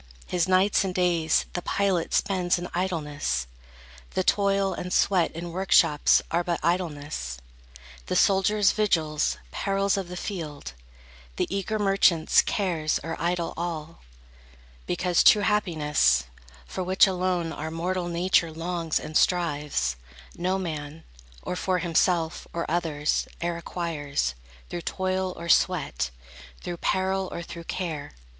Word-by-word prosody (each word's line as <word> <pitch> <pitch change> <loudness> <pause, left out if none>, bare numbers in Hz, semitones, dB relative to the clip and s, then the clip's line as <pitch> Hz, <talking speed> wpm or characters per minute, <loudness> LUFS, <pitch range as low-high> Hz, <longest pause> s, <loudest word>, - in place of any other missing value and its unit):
His 175 -1 0
nights 190 +3 +3
and 185 -2 -3
days 175 -3 +2
The 175 - -2
pilot 190 -3 0
spends 185 -3 +1
in 175 0 -5
idleness; 150 - -1 0.7
the 185 - +2
toil 195 0 +2
And 180 - -5
sweat 180 -4 +3
in 170 +1 -6
workshops 170 -5 +4
are 170 +1 +1
but 170 -1 -1
idleness; 150 - -2 0.7
The - - -1
soldier's 200 +1 +4
vigils, 160 -8 +1
perils 195 0 0
of 195 -2 -3
the 180 0 -7
field, 155 - -5 0.6
The - - 0
eager 200 +2 -1
merchant's 195 -5 +4
cares 170 -6 0
are 165 0 -3
idle 170 0 -1
all; 165 -1 -5 0.9
Because 180 0 +2
true 210 - +7
happiness, 150 - +2 0.4
for 185 - -4
which 185 +2 +5
alone 180 -3 -1
Our 155 +1 -5
mortal 175 +2 -2
nature 170 -1 +2
longs 165 0 -2
and 155 - -8
strives, 150 - +1 0.4
no 185 +2 0
man, 155 -3 -5 0.4
Or - - -3
for 185 0 0
himself, 170 -1 +1
or 170 - -2
others, 155 -3 0 0.2
e'er 170 0 -1
acquires 155 - -2 0.4
Through 175 - -3
toil 185 +1 -1
or 170 - -7
sweat, 155 - +2 0.5
through 175 - -4
peril, 190 +1 0
or 170 - -5
through 170 0 -9
care. 160 -6 -4
175 Hz, 130 wpm, -26 LUFS, 160-185 Hz, 0.9 s, true